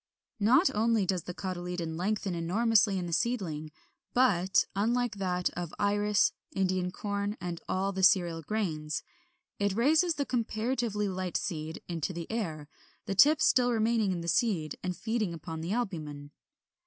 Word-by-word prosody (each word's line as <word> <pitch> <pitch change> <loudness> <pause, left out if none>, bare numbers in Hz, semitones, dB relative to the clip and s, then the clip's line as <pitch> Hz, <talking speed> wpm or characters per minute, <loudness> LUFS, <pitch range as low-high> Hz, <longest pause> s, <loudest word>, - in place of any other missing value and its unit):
Not 255 - +4
only 220 -1 +2
does 180 -3 -1
the 180 - -5
cotyledon 180 -3 -4
lengthen 195 +2 -1
enormously 205 +4 +2
in 180 - -2
the 170 - -4
seedling, 165 -10 -1 0.4
but 195 -7 +3
(unlike 230 +2 0
that 180 -2 0
of 175 -2 -6
Iris, 205 0 +2 0.2
Indian 185 -1 0
Corn, 200 +2 -3
and 175 -2 -5
all 195 +1 0
the 190 -1 -3
cereal 180 -4 +4
grains) 155 -6 -2 0.6
it 200 -1 +1
raises 315 - +3
the 285 - -1
comparatively 230 -3 -1
light 185 -2 -2
seed 160 -3 -4
into 170 +1 -3
the 170 -1 -5
air, 160 -10 -3 0.4
the - - -2
tip 290 +10 +6
still 245 -1 +4
remaining 225 -2 +2
in 175 -2 -2
the 170 - -6
seed 180 - +1
and 180 -1 -3
feeding 220 -5 -1
upon 160 0 -6
the 170 +3 -3
albumen. 155 -11 -3
195 Hz, 155 wpm, -30 LUFS, 175-220 Hz, 0.6 s, tip